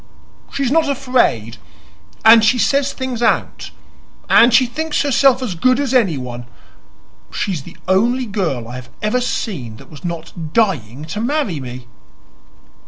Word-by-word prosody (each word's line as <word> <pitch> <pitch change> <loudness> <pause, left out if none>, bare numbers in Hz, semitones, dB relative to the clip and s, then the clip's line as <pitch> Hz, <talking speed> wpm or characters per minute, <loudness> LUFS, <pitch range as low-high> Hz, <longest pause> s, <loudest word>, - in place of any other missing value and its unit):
"She's 275 -2 -1
not 315 -1 +2
afraid, 250 - 0 0.7
and 225 0 +8
she 220 +3 +3
says 275 +5 +1
things 260 -3 -5
out, 235 - 0 0.6
and 235 +2 +6
she 250 +2 +5
thinks 305 +6 -2
herself 270 -2 +3
as 225 -7 -3
good 255 +10 +2
as 275 -3 -1
anyone. 130 - -1 0.8
She 200 - -2
is 165 -6 -3
the 170 +5 -14
only 235 +7 +2
girl 180 - -3
I 125 +2 -7
have 125 -1 -11
ever 215 +4 +1
seen 180 - -4
that - - -16
was 150 - -13
not 165 -2 -6
dying 150 - 0
to 205 +7 -5
marry 240 - -1
me." 125 -1 -8
220 Hz, 150 wpm, -18 LUFS, 155-255 Hz, 0.8 s, and